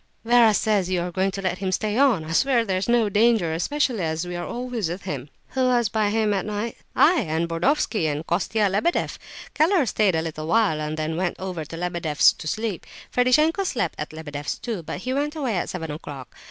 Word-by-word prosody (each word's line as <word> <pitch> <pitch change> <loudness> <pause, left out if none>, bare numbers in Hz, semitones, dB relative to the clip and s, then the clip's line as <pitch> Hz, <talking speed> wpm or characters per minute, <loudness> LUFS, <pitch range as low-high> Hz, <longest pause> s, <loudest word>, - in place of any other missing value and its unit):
Vera 235 -1 +6
says 205 -3 +1
you 185 -1 +1
are 175 +1 -3
going 190 +2 +1
to 195 0 -6
let 180 -1 -1
him 190 -1 -2
stay 210 +3 -1
on; 240 - +3
I 160 - -6
swear 240 +5 +3
there's 190 +1 -1
no 235 -2 +3
danger, 210 -5 +3
especially 245 - 0
as 160 +1 -2
we 175 0 -5
are 175 0 -4
always 240 -6 -3
with 180 +3 -5
him." 145 -7 -5 0.2
"Who 260 -1 0
was 240 -3 +2
by 215 -1 +1
him 215 -1 +1
at 195 -2 0
night?" 210 +2 -3 0.2
"I, 345 +1 +5
and 165 - -1
Burdovsky, 175 - +1
and 150 +1 -2
Kostia 200 +5 +1
Lebedeff. 205 - 0 0.3
Keller 320 0 +3
stayed 210 -5 +2
a 160 - 0
little 155 -1 -5
while, 185 -5 +2
and 155 +1 -3
then 155 +1 -2
went 180 0 -1
over 180 -4 -4
to 165 - -8
Lebedeff's 170 -4 +2
to - - -9
sleep. 215 +1 -3 0.2
Ferdishenko 305 +9 +3
slept 235 - -1
at 150 - -4
Lebedeff's, 150 -2 -5
too; 225 -7 -4
but 165 +3 -6
he 255 +4 -2
went 295 +3 -1
away 265 -8 -1
at 175 - -2
seven 160 -4 -5
o'clock. 145 -4 -8
195 Hz, 215 wpm, -24 LUFS, 165-235 Hz, 0.3 s, Vera